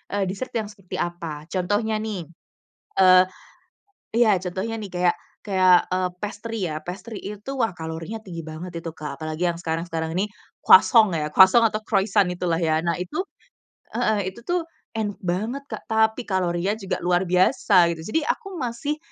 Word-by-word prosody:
eee, 200 - +1
dessert 255 +7 -5
yang 220 - -1
seperti 195 -3 -9
apa. 165 -3 -4
Contohnya 205 +4 0
nih, 210 -6 -4 0.8
eee 185 -1 +8 0.9
iya 225 -3 +4
contohnya 190 +5 -3
nih 210 -3 -6
kayak 180 0 +2 0.3
kayak, 185 -3 +4
eee, 185 0 0
pastry 210 -3 -4
ya. 155 - -3
Pastry 200 +5 -6
itu 210 +8 -6
wah 225 -6 +1
kalorinya 165 +6 -6
tinggi 170 -5 -8
banget 170 +2 -6
itu, 165 -1 -7
Kak. 145 -2 -7
Apalagi 155 +3 -1
yang 170 - -5
sekarang-sekarang 165 -1 -3
ini 200 +4 0 0.3
croissant 225 -4 +7
ya, 155 -3 -1
croissant 195 +5 +7
atau 215 0 -2
croissant 200 -3 +2
itulah 175 -1 -1
ya. 160 -1 +2
Nah 170 +1 0
Itu 250 - -3 0.7
heeh. 200 -3 0
Itu 235 - -13
tuh 350 +6 -1 0.3
enak 205 -2 -3
banget 210 +10 -2
Kak - - -7
tapi 220 +2 +1
kalorinya 185 0 0
juga 200 -3 -3
luar 175 0 +3
biasa, 185 0 +4
gitu. 160 - -9
Jadi 290 - -1
aku 390 -5 -3
masih 270 +3 -3
190 Hz, 165 wpm, -24 LUFS, 175-220 Hz, 0.9 s, eee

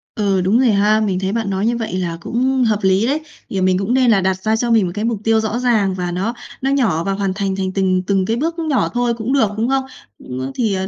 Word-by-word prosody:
Ừ, 200 -4 +1
đúng 195 +6 +2
rồi 255 -2 +4
ha. 210 +2 +3
Mình 195 -4 0
thấy 190 0 -2
bạn 225 -1 -2
nói 195 +1 -1
như 235 +1 +1
vậy 225 -4 -4
là 170 -2 -3
cũng 255 +6 0
hợp 215 -3 +1
lý 190 +3 +3
đấy. 285 +4 +1 0.3
Thì 195 - -2
mình 185 0 +3
cũng 200 +5 -1
nên 255 -2 +4
là 200 -3 +3
đặt 190 0 -1
ra 220 0 +2
cho 235 +1 -1
mình 225 -4 +4
một 175 - -3
cái 210 +1 -2
mục 230 -1 0
tiêu 225 0 +3
rõ 220 +2 -2
ràng 220 -6 +2
và 180 -1 -3
nó 190 +7 -2 0.3
nó 270 +1 0
nhỏ, 225 - +1
và 195 - -1
hoàn 195 -1 -1
thành 195 -1 -2
thành 190 -1 -2
từng 185 -1 +1
từng 195 -2 +1
cái 225 - 0
bước 330 +5 -2
nhỏ 310 -5 0
thôi 245 -1 +1
cũng 235 +4 -2
được, 270 -6 +3
đúng 230 +3 0
không? 270 0 +1 0.5
Ừm, 130 +1 -4
thì, 220 -4 0
ờ, 190 0 -2
210 Hz, 280 wpm, -18 LUFS, 190-235 Hz, 0.5 s, rồi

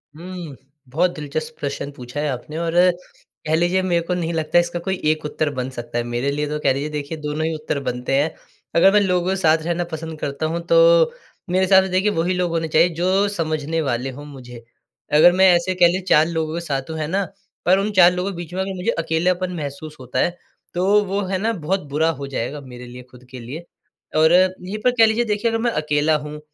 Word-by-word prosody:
हुँ, 175 -3 -8 0.3
बहुत 175 +7 +1
दिलचस्प 155 +1 -5
प्रश्न 140 0 -4
पूछा 125 0 -8
है 150 - 0
आपने 135 +4 -5
और 165 0 -2 0.7
कह 155 - +2
लीजिए, 175 +3 +2
मेरे 175 -2 +1
को 170 +2 -3
नहीं 170 -2 -2
लगता, 160 +1 +2
इसका 175 0 -1
कोई 190 +2 -2
एक 155 0 +1
उत्तर 150 0 -1
बन 130 0 -3
सकता 120 -2 -6
है। 120 - 0
मेरे 120 +4 -2
लिए 150 +1 -2
तो 150 0 -3
कह 135 -2 +2
लीजिए, 140 +3 -3
देखिए, 150 +1 -5
दोनों 150 +1 -3
ही 160 - -2
उत्तर 155 -2 -3
बनते 125 +2 -3
हैं। 155 +2 0 0.4
अगर 190 +3 +6
मैं 210 - +6
लोगों 180 -2 +1
के 190 - +1
साथ 165 -4 +3
रहना 170 +1 -1
पसंद 160 0 -6
करता 140 +2 -3
हूँ, 165 +2 -2
तो - - +5 0.4
मेरे 185 +1 +2
हिसाब 190 0 +6
से, 190 - -4
देखिए, 185 +3 +2
वहीं 175 +1 0
लोग 180 -2 0
होने 165 -1 -1
चाहिए, 160 +3 +4
जो 185 +4 +1
समझने 160 -3 -2
वाले 130 -2 -2
हों 145 +3 -10
मुझे। 125 -5 -11 0.5
अगर 155 +4 +7
मैं, 190 +1 +5
ऐसे 180 +2 0
कह 175 -1 +6
लें, 185 - -2
4 155 -3 +5
लोगों 160 -2 -2
के 170 - -2
साथ 135 -2 -3
हूँ, 160 - -4
है 155 - -2
ना? 195 +4 0 0.4
पर 185 +2 +5
उन 205 +2 -1
4 180 -3 +6
लोगों 180 +2 -2
के - - -9
बीच 175 0 -8
में 190 - -1
अगर 190 0 -3
मुझे 185 +5 -1
अकेलापन 180 +3 0
महसूस 150 0 -6
होता 130 0 -4
है, 175 +5 0 0.4
तो 195 +4 +3
वो, 200 +1 -1
है 190 0 -1
ना, 225 +4 0
बहुत 190 +1 -2
बुरा 155 +3 +1
हो 140 - -4
जाएगा 135 +2 -4
मेरे 125 -2 -11
लिए, 125 +1 -10
खुद 125 0 -16
के 130 - -8
लिए। 140 +9 -8 0.5
और 160 +1 +5
यहीं 185 +2 +2
पर 250 - +4
कह 225 - +7
लीजिए, 220 +2 +1
देखिए 210 +1 0
अगर 225 - 0
मैं 240 0 +1
अकेला 150 -2 +1
हूँ, 150 0 -7
165 Hz, 235 wpm, -21 LUFS, 150-185 Hz, 0.7 s, अगर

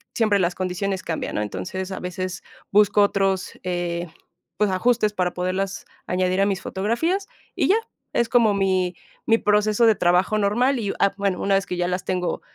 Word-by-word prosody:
siempre 215 -3 +3
las 175 -1 0
condiciones 190 +1 -2
cambian, 165 - -3
¿no?, - - 0
entonces, 145 - -5
a 190 - -4
veces 185 0 -4 0.3
busco 205 0 +5
otros, 195 -2 +1
eh, 175 -1 -2 0.5
pues, 210 0 +2
ajustes 215 +2 +2
para 180 -3 -1
poderlas 185 +2 -2 0.2
añadir 185 +1 +1
a 200 - +3
mis 195 -2 -1
fotografías 325 - -1 0.3
y - - +1
ya, 395 - +6 0.4
es 235 - +2
como 225 -4 +4
mi 185 -2 +1 0.3
mi 225 0 +5
proceso 210 +2 +2
de 225 - +6
trabajo 180 +4 +2
normal 240 +6 +2
y, 205 -3 -1
ah, 200 - +3
bueno, 200 -3 -1
una 200 - +1
vez 195 0 0
que 180 - -3
ya 175 0 0
las 180 0 -2
tengo 180 -1 -2
195 Hz, 180 wpm, -23 LUFS, 180-210 Hz, 0.5 s, ya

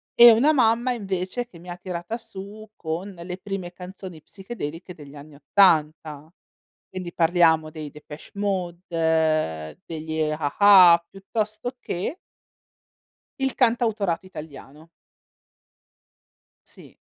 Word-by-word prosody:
E 235 0 +10
una 245 +7 +4
mamma, 240 -2 +2
invece, 195 +1 -3
che 185 -8 -16
mi 175 +2 -13
ha 175 - -6
tirata 180 +4 -5
su 215 -1 -11
con 165 +4 -5
le 180 +1 -7
prime 195 -2 -6
canzoni 180 -1 -10
psichedeliche 180 -2 -8
degli 145 -3 -13
anni 145 +1 -13
80. 155 -3 +2 0.6
Quindi 185 -2 -7
parliamo 165 -2 +3
dei 155 -2 -8
Depeche 150 0 -12
Mode, 165 - -1
degli 160 -1 -4
A-ha, 170 +3 +5
piuttosto 215 +4 -4
che 190 - -4 1.3
il 270 -1 0
cantautorato 220 -8 +1
italiano. 155 -2 -11 1.8
Sì. - - -17
180 Hz, 105 wpm, -24 LUFS, 160-205 Hz, 1.8 s, E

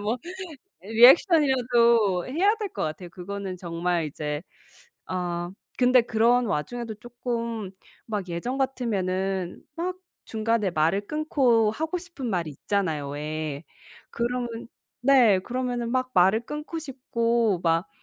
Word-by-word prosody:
뭐 215 +4 0 0.7
리액션이라도 235 - +5
해야 370 - +2
될 425 -3 -4
것 - - -2
같아요. 155 +3 -5
그거는 190 +1 -6
정말 170 -1 -1
이제 150 0 -4 0.6
아 175 -1 -3 0.3
근데 250 0 +5
그런 235 +2 +3
와중에도 225 +6 -3
쪼끔 230 -2 -4 0.3
막 205 -4 -3
예전 175 +10 -3
같으면은 195 -8 -1
막 360 +2 -2 0.3
중간에 220 -2 0
말을 170 +5 +1
끊고 260 -8 +2
하고 320 +9 -2
싶은 335 -8 -6
말 175 -5 -1
있잖아요 155 -1 -2
왜. 150 0 -4 0.5
그러면 235 -1 -3 0.3
네 245 -7 +5
그러면은 245 +2 -3
막 255 0 0
말을 190 +4 +4
끊고 300 +4 -5
싶고 235 - 0
막 165 0 +2
225 Hz, 245 characters per minute, -26 LUFS, 180-250 Hz, 0.7 s, 리액션이라도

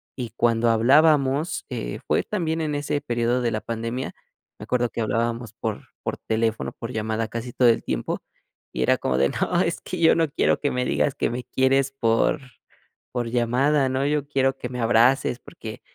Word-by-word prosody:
y 125 -3 -5
cuando 115 0 +3
hablábamos, 140 +5 +3
eh, - - -4
fue - - +2
también 165 -5 -2
en 150 -2 -1
ese 145 0 -1
periodo 120 -1 0
de 120 -2 0
la 110 - -2
pandemia, 115 +3 -4 0.4
me - - -8
acuerdo 120 -1 +1
que 115 - -4
hablábamos 115 +1 -1
por 110 -2 -5
por - - -3
teléfono, 110 0 -1
por 115 +1 -7
llamada 110 0 -1
casi 115 +2 -5
todo 125 -2 +5
el 115 - +2
tiempo, - - -3 0.5
y 65 - -3
era - - +3
como 65 - -1
de: 70 +1 +3
"No, - - 0
es - - -1
que - - -5
yo 165 -1 +5
no 165 -2 +2
quiero - - +2
que 145 - +1
me 125 0 0
digas 140 - +1
que - - 0
me 125 +1 -4
quieres 135 +1 +2
por 115 +1 +1 0.7
por 120 -2 -2
llamada, 130 +4 +2
¿no? 130 +1 0
Yo 145 -1 0
quiero 135 -2 +1
que 125 - -5
me 125 -1 -4
abraces 120 +2 +3
porque, 110 +1 -9
125 Hz, 190 wpm, -24 LUFS, 115-135 Hz, 0.7 s, todo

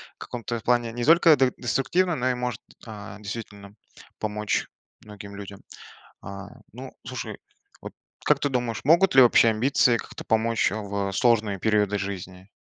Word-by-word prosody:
в - - -67
каком-то 120 -1 -5
плане, 120 0 +1
не 120 - -4
только 165 +2 +6
де 130 -1 +2
деструктивно, 165 +8 0
но 130 -2 0
и - - 0
может, 125 -2 -4 0.2
а, 105 -2 -9
действительно 100 -1 -8 0.4
помочь 105 -1 -2 0.4
многим 100 -1 -11
людям. 100 -1 -9 0.6
А, 100 +1 -8 0.2
ну, 130 +2 -9
слушай, 130 0 -6 0.4
вот - - -8 0.3
как - - +3
ты 145 - 0
думаешь, 120 -4 -2
могут 170 +4 +4
ли 130 - +9
общие 115 -1 +5
амбиции 120 +1 +2
как-то - - -9
помочь, 115 -3 +1
а, - - -3
в 100 -1 -3
сложные 110 -3 +2
периоды 105 -2 +1
жизни? 95 -1 -7
115 Hz, 155 wpm, -25 LUFS, 100-125 Hz, 0.6 s, ли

